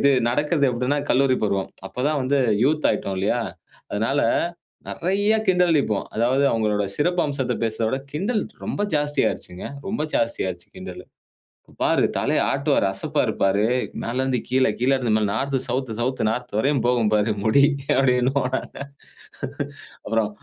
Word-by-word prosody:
இது 140 - +5 0.2
நடக்குது 145 +2 +1
அப்படின்னா, 125 +4 0
கல்லூரி 130 0 +3
பருவம். 100 -2 -1 0.2
அப்போ - - -6
தான் 150 -2 0
வந்து 135 +2 +2 0.2
யூத் 155 +2 +2
ஆயிட்டோம் 95 -1 -2
இல்லையா, 105 +6 +1 0.5
அதனால 115 +7 0 0.7
நெறைய 200 +5 +1
கிண்டலடிப்போம். 165 - +2
அதாவது 125 +5 +2
அவங்களுடைய 105 -3 0
சிறப்பு 175 +3 +1
அம்சத்த 135 -4 -1
பேசுறத 110 0 -1
விட 130 - -1
கிண்டல் 205 +8 0 0.2
ரொம்ப - - -3 0.2
ஜாஸ்தி 145 0 0
ஆயிருச்சுங்க. 90 +1 -6 0.2
ரொம்ப 195 -3 -2
ஜாஸ்தி 115 0 0
ஆயிருச்சு 90 -2 -6
கிண்டல். - - -8 0.6
"இப்போ - - -22
பாரு - - +3
தலைய - - +1
ஆட்டுவாரு. 140 -5 +1
அசப்பாரு 95 - -1
பாரு 100 +2 +3 0.4
மேல 115 - -3
இருந்து 130 -2 0
கீழ 130 0 +3
கீழ 125 +2 +2
இருந்து 120 -4 0
மேல 110 - +1
நார்த் 135 +5 -1
சவுத், 125 -1 -2
சவுத் 130 +2 -1
நார்த் 125 +2 -4
வரையும் 135 +4 +2
போகும் 120 -4 +2
பாரு 105 +1 +2
முடி." 110 +6 +4 0.3
அப்படின்னுவோம் 130 0 +2
நாங்க. - - -8 1.3
அப்புறம் 115 -2 +1
130 Hz, 150 wpm, -23 LUFS, 110-145 Hz, 1.3 s, இது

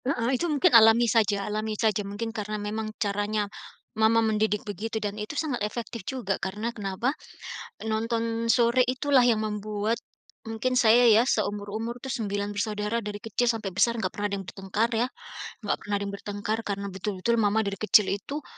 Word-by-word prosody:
Heeh 250 -2 0
itu 335 +7 0
mungkin 285 -4 +3
alami 230 +1 +7
saja 210 -3 +2
alami 215 0 -2
saja, 215 -2 +1
mungkin 205 +3 -5
karena 215 -1 -3
memang 215 +1 -3
caranya 205 +1 0 0.6
mama 220 +1 +5
mendidik 215 -1 +1
begitu 215 +2 -4
dan 205 -2 -2
itu 215 +8 -5
sangat 290 -8 -1
efektif 225 +2 -4
juga 245 -7 -2
karena 210 +5 -3
kenapa? 210 +5 -2 0.8
Nonton 230 +1 -1
sore 240 +1 +4
itulah 260 +1 +3
yang 230 -3 +3
membuat 210 +1 -2 0.5
mungkin 250 +3 0
saya 235 +2 +6
ya, 230 +4 +5
seumur-umur 215 +2 -2
itu 265 - -7
9 205 -5 -2
bersaudara 210 +1 -1
dari 205 0 -5
kecil 225 +2 -1
sampai 225 -4 -2
besar 230 +5 +1
nggak - - 0
pernah 205 - -1
ada - - +1
yang 190 - -9
bertengkar 195 +4 -1
ya, 230 - +2 0.6
nggak 205 - 0
pernah 205 0 -3
yang 200 - -4
bertengkar 205 +2 -3
karena 200 0 -3
betul-betul 190 +4 -1
mama 215 +1 +2
dari 200 -1 -3
kecil 210 -2 +4
itu 280 +9 -4
215 Hz, 170 wpm, -27 LUFS, 205-235 Hz, 0.8 s, alami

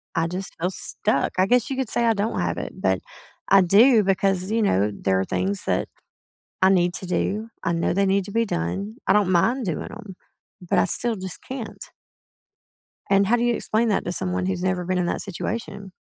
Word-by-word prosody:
I 165 0 +1
just 180 +1 -5
feel 180 +2 0
stuck, 140 -6 0
I 185 - +4
guess 245 +2 +2
you 265 - -3
could 260 -4 -1
say 235 - +1
I 225 - +4
don't 210 +2 -2
have - - -1
it, - - -5
but - - +1 0.5
I 195 0 +7
do 215 +5 +5
because, 195 0 0
you 225 0 +1
know, 105 - +2
there 95 -1 0
are 95 - 0
things 195 +1 -2
that - - 0 0.8
I 190 - +7
need 180 -2 +2
to 185 - -5
do, 210 +5 -1
I 170 - 0
know 170 - 0
they 195 +1 +2
need 195 0 +2
to 200 - -8
be 230 0 +2
done, 95 - -3
I - - +4
don't 200 -2 +3
mind 230 +7 +2
doing 165 - -3
'em, 210 -4 -10 0.4
but 180 - 0
I - - +4
still 235 -2 0
just 190 -1 -6
can't. 255 -3 -7 1.3
And, 195 0 +4
how 240 - +4
do 240 - 0
you 240 0 +2
explain 225 +1 0
that 200 - 0
to 175 - -2
someone 180 0 -2
who's 185 -1 -2
never 185 -1 0
been 185 0 -1
in 180 - +1
that - - -2
situation? 200 0 -5
195 Hz, 215 wpm, -23 LUFS, 180-220 Hz, 1.3 s, I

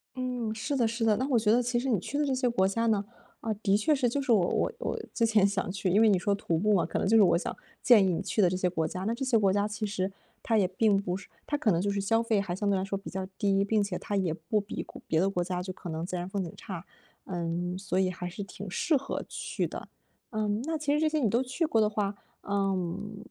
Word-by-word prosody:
嗯， 250 -3 -2
是 285 +6 -2
的 240 -4 +3
是 230 0 -1
的。 215 -2 +4
那 260 - -1
我 245 -4 +4
觉 215 -1 +2
得 240 +2 +4
其 240 0 0
实 265 +2 -2
你 215 -7 +2
去 285 - -4
的 295 - +2
这 275 - 0
些 255 -1 +1
国 190 -5 +2
家 230 +4 0
呢， 205 -2 +2 0.4
啊， 225 - -1
的 200 -1 +1
确 260 +9 +2
是， 265 -3 +2
就 280 +4 -1
是 270 -3 0
我 190 -6 +4
我 - - 0
我 - - -2
之 230 - +2
前 220 -3 +4
想 200 -2 0
去， 190 0 -1
因 200 +5 +4
为 225 - +6
你 195 - +4
说 200 +3 +1
徒 170 -4 -1
步 210 +5 +2
嘛， 180 - +3
可 - - -3
能 - - 0
就 220 - +4
是 210 - +7
我 175 - +4
想 - - -4 0.3
建 220 -6 +7
议 185 - +2
你 - - -1
去 215 - 0
的 180 - +5
这 185 - -1
些 185 -1 +1
国 165 -3 -1
家。 185 - -5
那 220 +4 0
这 255 +3 -4
些 255 -3 +3
国 200 -3 +3
家 205 +1 +1
其 215 0 -3
实 195 -2 -2 0.3
它 225 - +1
也 195 -3 +3
并 200 +2 +2
不 180 -3 -2
是 195 - -12 0.2
它 295 - -1
可 250 -8 +2
能 170 -1 +2
就 200 - 0
是 200 0 -1
消 225 +4 +2
费 220 -3 +2
还 180 -3 -3
相 205 +1 -1
对 200 - +3
来 190 - -1
说 195 0 -2
比 195 - -8
较 190 -1 -4
低， 195 -1 +2
并 210 +1 +2
且 200 -3 -3
它 205 - -3
也 185 -5 +1
不 215 +6 -1
比 205 - -5
国 - - -12
别 160 - +2
的 190 +3 +3
国 180 -3 -1
家 180 0 -3
就 185 - -5
可 180 - -8
能 160 +1 -3
自 185 - -4
然 175 0 -3
风 190 0 -2
景 170 - -6
差。 185 -2 -7 0.4
嗯， 175 0 -3
所 190 -1 -1
以 185 - +2
还 180 0 -5
是 180 - -7
挺 200 0 -7
适 310 - +1
合 275 0 -2
去 - - -3
的。 - - -8 0.4
嗯， 215 0 -1
那 320 +3 -1
其 290 -1 0
实 300 - +2
这 315 - +3
些 310 0 0
你 240 -7 +2
都 235 +5 +2
去 265 +6 -1
过 225 -8 +2
的 210 - +3
话， 205 -1 -1 0.3
嗯， 195 0 -2
205 Hz, 315 characters per minute, -29 LUFS, 185-230 Hz, 0.4 s, 是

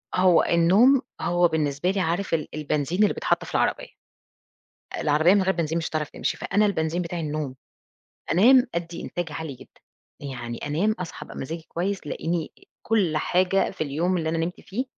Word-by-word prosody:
هو 180 -2 +5
النوم 200 +11 +5 0.2
هو 175 0 +3
بالنسبة 155 0 -1
لي 195 - -2
عارف 175 +2 -1
ال 155 -2 0
البنزين 155 +5 0
اللي 210 - +3
بيتحط - - 0
في - - -10
العربية، - - +1 1.1
العربية 155 +5 +4
من 200 - +3
غير 190 +1 +2
بنزين 165 -1 -1
مش 165 - -2
هتعرف 155 -2 -3
تمشي، - - -2
فأنا 210 +1 +1
البنزين 170 -3 -1
بتاعي 170 0 -4
النوم، 150 -4 -3 0.8
أنام 250 +8 +6
أدّي 170 0 -4
إنتاج 175 -3 -4
عالي 155 -1 -5
جدًا، - - -18 0.4
يعني 120 -4 -6
أنام 170 +9 +1
أصحى 180 -2 -7
أبقى - - -11
مزاجي 160 +4 -5
كويس 190 +3 -2
تلاقيني 165 +2 -3 0.3
كل 195 -8 +1
حاجة 185 +4 +2
في - - -16
اليوم 165 +6 0
اللي 160 -2 -1
أنا 165 +1 -1
نمت 165 +2 -3
فيه 230 +7 -4
170 Hz, 170 wpm, -25 LUFS, 155-185 Hz, 1.1 s, أنام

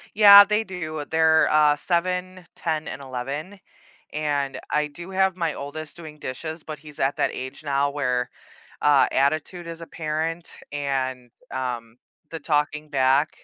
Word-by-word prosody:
Yeah 205 -1 +10
they 210 +2 0
do. 155 -6 -5
They're, 160 0 +4
uh, 150 -1 +5
7, 180 +2 -2
10 155 -2 -2
and 140 - -7
11, 140 +9 -5 0.5
and 145 -2 -1
I 150 0 +2
do 170 +5 -10
have 190 -1 +2
my 165 -4 -1
oldest 150 +3 -7
doing 155 -3 -10
dishes, 155 +4 -6
but 155 -1 -7
he's 150 0 -12
at 135 +1 +1
that - - +1
age 130 +3 -7
now 140 0 +1
where, 125 -4 -1 0.5
uh, 145 -2 +5
attitude 155 +5 0
is 165 0 -7
apparent 165 0 -3 0.2
and, 130 -3 -2 0.2
um, 120 -3 -4 0.3
the 165 - -5
talking 150 0 -1
back, 135 +1 +3
150 Hz, 145 wpm, -24 LUFS, 140-170 Hz, 0.5 s, Yeah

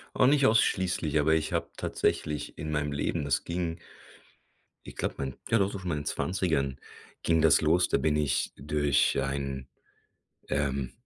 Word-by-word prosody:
Oh, - - +4
nicht 140 +1 +4
ausschließlich, 90 - +2
aber 80 +2 +3
ich 80 - -1
habe - - -1
tatsächlich 75 -2 -2
in 75 - -5
meinem 75 -1 -1
Leben 70 +1 -1
das 70 -3 0
ging 85 -1 -3 1.1
ich - - -10
glaube, - - -2
mein 65 -2 -4
ja, 115 - +3
doch 100 0 +1
so - - -5
schon 90 -1 -4
in 75 - -1
meinen 75 - -5
20er 80 -9 -1 0.4
ging 80 -1 +3
das 80 -1 +5
los. 85 +3 +3
Da - - +2
bin 75 -1 +1
ich 75 -4 0
durch 75 -1 +1
einen, 70 -1 -3 0.8
ähm, 70 -1 -1
75 Hz, 170 wpm, -28 LUFS, 70-85 Hz, 1.1 s, das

